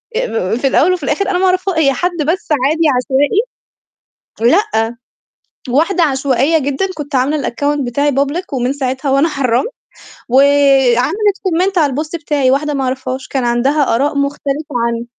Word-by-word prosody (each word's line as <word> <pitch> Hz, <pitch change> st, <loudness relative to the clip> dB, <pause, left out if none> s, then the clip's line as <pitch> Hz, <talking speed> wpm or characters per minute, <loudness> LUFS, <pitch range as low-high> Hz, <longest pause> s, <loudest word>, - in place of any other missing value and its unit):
أ 225 Hz, -, -1 dB
في 270 Hz, -, 0 dB
الأول 345 Hz, +7 st, +3 dB
وفي 345 Hz, -5 st, -4 dB
الآخر 340 Hz, +8 st, -1 dB
أنا 360 Hz, -, 0 dB
ما 380 Hz, -, +2 dB
أعرفها 370 Hz, -1 st, 0 dB
هي 275 Hz, -4 st, +3 dB
حد 350 Hz, +4 st, -2 dB
بس 355 Hz, +4 st, -1 dB, 0.2 s
عادي 320 Hz, +3 st, +1 dB
عشوائي 270 Hz, -, +1 dB, 1.0 s
لأ، 235 Hz, -, +1 dB, 0.7 s
واحدة 335 Hz, +8 st, +1 dB
عشوائية 275 Hz, +1 st, +1 dB
جدًا، 285 Hz, +6 st, -1 dB
كنت 295 Hz, -1 st, -8 dB
عاملة 275 Hz, +3 st, 0 dB
الaccount 290 Hz, +4 st, -1 dB
بتاعي 285 Hz, +4 st, 0 dB
public 285 Hz, +7 st, -1 dB
ومن 255 Hz, 0 st, -1 dB
ساعتها 265 Hz, 0 st, -3 dB
وأنا 275 Hz, +5 st, +3 dB
حرّمت، 265 Hz, -, 0 dB, 0.6 s
وعملِت 280 Hz, -, +3 dB
comment 370 Hz, +2 st, 0 dB
على 290 Hz, -5 st, +2 dB
الpost 305 Hz, +4 st, -4 dB
بتاعي، 285 Hz, -4 st, +1 dB
واحدة 295 Hz, +2 st, 0 dB
ما 270 Hz, -1 st, -2 dB
أعرفهاش 260 Hz, 0 st, -4 dB
كان 265 Hz, -3 st, -2 dB
عندها 255 Hz, +2 st, +1 dB
آراء 280 Hz, +3 st, 0 dB
مختلفة 280 Hz, +1 st, -3 dB
عن 235 Hz, 0 st, -3 dB
280 Hz, 155 wpm, -15 LUFS, 260-320 Hz, 1.0 s, الأول